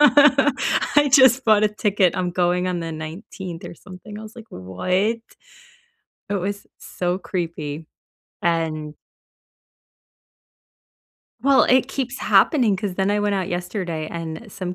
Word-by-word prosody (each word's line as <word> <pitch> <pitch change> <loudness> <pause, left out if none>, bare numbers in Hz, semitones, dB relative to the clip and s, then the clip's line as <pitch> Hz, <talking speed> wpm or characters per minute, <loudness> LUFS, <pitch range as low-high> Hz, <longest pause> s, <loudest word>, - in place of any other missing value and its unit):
I 290 0 +4
just 260 -1 +6
bought 215 -1 +4
a - - +4
ticket, 205 -3 +1
I'm 180 -1 -1
going 180 0 +1
on 180 -1 -2
the 165 -1 -5
19th 170 +2 -8
or - - -8
something," 205 +4 -11
I - - -9
was 220 +2 -12
like, 230 -1 -11
"What?" 95 - -7 1.4
It - - -1
was 200 +2 -4
so 180 0 -3
creepy, 165 -5 -5 0.6
and 160 -3 -1 2.5
well, 275 0 +5
it 255 0 +3
keeps 265 -1 -4
happening 240 - +3
'cause 200 -2 -4
then 190 +1 0
I 205 0 +1
went 205 -1 0
out 190 -1 -2
yesterday, 175 -3 -4
and 165 +6 -7
some 185 -3 -5
190 Hz, 135 wpm, -22 LUFS, 170-220 Hz, 2.5 s, just